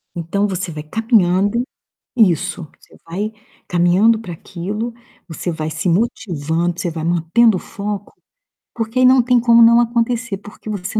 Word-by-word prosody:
Então 175 +5 -1
você 185 -3 -4
vai 150 -1 -7
caminhando 205 +2 +1 0.5
isso, 185 -5 +1
você - - -21
vai 200 +6 -4 0.4
caminhando 180 +6 +3
pra 180 -6 -7
aquilo, 205 +8 -5 0.3
você 170 +1 -4
vai 155 -1 -4
se 160 +3 -2
motivando, 170 -4 -1
você 175 - -2
vai 160 -1 -5
mantendo 175 +6 +3
o - - -5
foco, 205 0 -6 0.6
porque 225 +2 -3
aí 255 - +5
não 255 0 +6
tem 245 0 +3
como 235 0 +5
não 235 +1 +7
acontecer, 235 -2 0
porque 205 +1 -12
você 205 +1 -3
200 Hz, 155 wpm, -18 LUFS, 175-230 Hz, 0.6 s, não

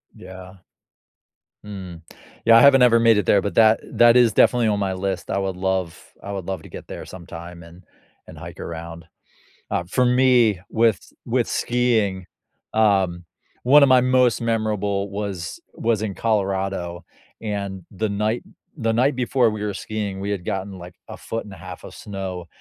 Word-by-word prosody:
Yeah. 95 0 -12 1.1
Mm, 95 -5 -8 0.4
yeah 115 0 +7
I - - +7
haven't 135 -2 +7
ever 115 -2 +6
made 115 -2 +5
it - - -2
there, 100 - +4
but 100 - -3
that 110 -1 +5
eh - - -14
that 120 +1 +6
is 120 -3 +4
definitely 120 +1 +4
on 105 -1 +1
my 95 -1 -1
list. 95 -1 -4
I 95 - -1
would 95 -1 -2
love 95 -2 -2 0.3
I 100 - -6
would 95 -3 -5
love 95 -4 -5
to - - -13
get - - -10
there - - -8
sometime 85 -1 -10
and 85 +2 -15 0.4
and - - -12
hike - - -10
around. 85 0 -7 0.7
Uh, - - 0
for 125 +8 +1
me, 125 -6 +3
with 110 -3 +1
with - - 0
skiing, 110 -6 0 0.5
um, 95 -5 +2 0.4
one 145 +4 +7
of 140 - +5
my 130 -1 +6
most 125 -2 +2
memorable 105 -3 -1
was 100 -4 -5
was 110 -2 -1
in 105 -3 -3
Colorado, 95 -5 -2 0.4
and 100 -4 -4
the 105 +2 -2
night 105 +3 -1 0.3
the 115 -4 0
night 130 +4 +2
before 125 -1 +2
we 105 -1 -5
were 105 -1 -2
skiing, 105 -1 -4
we 100 +1 -3
had 95 -4 -3
gotten, 95 0 -4
like, 90 0 -11
a - - -8
foot 115 -1 -6
and 100 - -11
1/2 90 0 -10
of - - -10
snow, 95 -3 -6
100 Hz, 180 wpm, -22 LUFS, 95-115 Hz, 1.1 s, yeah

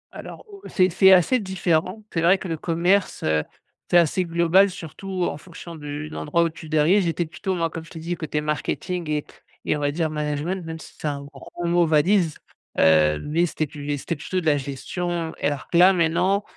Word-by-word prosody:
Alors - - -9
au 400 -1 -13
c'est 185 -1 +2
c'est 190 +2 +6
assez 190 +8 +5
différent. 185 +1 -1
C'est 165 - 0
vrai 180 +3 +5
que 190 - -7
le 165 - -2
commerce, 175 +5 +1
heu, 80 0 +2 0.5
c'est 175 - +5
assez 175 +2 +3
global 170 +4 +4
surtout 185 +1 -5
en - - -3
fonction 170 0 -11
du 150 0 -6
de - - -12
l'endroit 170 +3 0
où 165 - +1
tu 160 -1 -11
te - - -12
diriges. 165 +6 +4
J'étais 170 0 -1
plutôt 190 +4 -4
moi, 165 -2 -1
comme 165 - -6
je 165 - -15
t'ai 165 - -11
dit, 170 +2 -3
côté 155 -2 -3
marketing 155 +3 -3
et 150 -1 -1 0.4
et - - +1
on - - -3
va 145 - 0
dire, 160 0 -1
management 150 +4 -2
même 160 0 -6
si - - -13
c'est 155 - -3
un 140 -1 -3
gros 170 +5 -8
mot 170 -1 +3
valise. 160 +2 +2 0.4
Heu, 75 -1 +4
mais 165 - +1
c'était 155 - -2
plu 145 0 -10
mais 145 -1 -1
c'était 165 - -4
plutôt 165 +5 -3
de 170 - -7
la 145 -2 +3
gestion. 165 +5 -4
Alors 145 -1 -2
que, 170 - +2
là, 190 +2 +7
maintenant, 180 +4 +1
165 Hz, 220 wpm, -23 LUFS, 150-180 Hz, 0.5 s, là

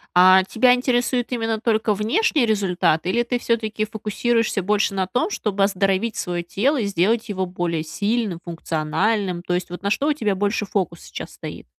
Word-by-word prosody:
А, 185 +1 +7
тебя 245 +6 +3
интересует 245 0 0
именно 225 -2 -1
только 220 -2 +1
внешний 240 - +1
результат? 185 -6 +1
Или 235 +6 +1
ты 245 0 -2
всё-таки 220 -2 -1
фокусируешься 220 0 -1
больше 205 +1 +1
на 190 -1 -1
том, 250 - 0
чтобы 200 - -1
оздоровить 195 +2 +1
свое 175 -1 -2
тело 255 - 0
и 215 - 0
сделать 215 +4 +1
его 190 -2 -1
более 175 -3 -2
сильным, 200 +2 -2
функциональным? 175 +3 -1
То 180 - -3
есть, 180 0 -2
вот 180 - -7
на 200 - 0
что 275 +7 0
у 305 - +3
тебя 215 -9 -1
больше 205 +2 0
фокус 180 -4 -2
сейчас - - -8
стоит? - - -8
205 Hz, 180 wpm, -22 LUFS, 185-230 Hz, -, А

